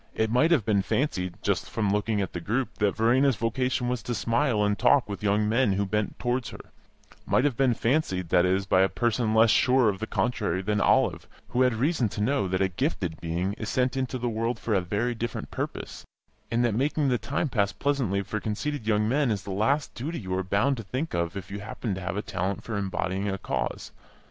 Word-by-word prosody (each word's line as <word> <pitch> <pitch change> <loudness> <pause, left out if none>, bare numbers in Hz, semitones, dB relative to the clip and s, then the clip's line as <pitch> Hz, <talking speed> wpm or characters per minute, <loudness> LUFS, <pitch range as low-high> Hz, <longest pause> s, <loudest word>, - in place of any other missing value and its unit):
It 110 0 0
might 125 +7 +4
have 150 - +3
been 105 -3 +2
fancied, 90 -8 -1
just - - 0
from 105 -3 0
looking 105 +1 0
at 95 - -4
the 85 - -3
group, 115 +4 -2
that 105 -2 +2
Verena's 125 +4 +3
vocation 125 +3 -1
was 125 -2 -1
to 120 - -3
smile 115 -1 +1
and 105 0 +1
talk 120 +7 +3
with 100 -2 -6
young 105 +1 +2
men 115 -1 +2
who 100 +1 0
bent 105 +2 -2
towards 125 0 -1
her; - - -10 0.7
might 130 - +3
have 145 -4 +1
been 130 -2 +2
fancied, 110 - 0
that 90 +1 +4
is, 95 +2 +1
by 95 -1 +3
a 95 - +4
person 115 -2 0
less 110 0 +6
sure 125 0 +4
of 95 -2 -3
the 110 - -4
contrary 115 -6 -1
than 105 +1 0
Olive, - - +2 0.2
who 125 - 0
had 125 -3 +3
reason 130 -1 +1
to 105 - -7
know 130 -1 +1
that 95 +1 0
a - - +3
"gifted 90 - -2
being" 85 +4 -1
is 110 - -4
sent 130 0 +1
into 130 -1 -2
the 120 0 -2
world 115 +1 -1
for 110 - -2
a 95 - +3
very 105 +7 -1
different 115 -1 -5
purpose, - - -5 0.5
and 120 +1 +1
that 120 - +1
making 140 +4 +1
the 125 -2 +1
time 140 +7 -1
pass 100 -6 +1
pleasantly 125 -9 0
for 110 +3 -3
conceited 115 +4 -3
young 105 -1 +2
men 140 +2 +2
is 100 -3 -1
the 100 - -6
last 115 +10 0
duty 155 +7 -4
you 95 -5 -5
are 95 - 0
bound 100 +9 +1
to 115 - -6
think 130 +10 -4
of 85 +2 -1
if 95 - -8
you 100 - -4
happen 105 +1 -4
to 95 - -5
have 95 +1 -3
a 105 - -2
talent 95 -1 -3
for 115 - -4
embodying 95 0 -2
a 95 - -2
cause. - - -3
110 Hz, 230 wpm, -27 LUFS, 100-125 Hz, 0.7 s, less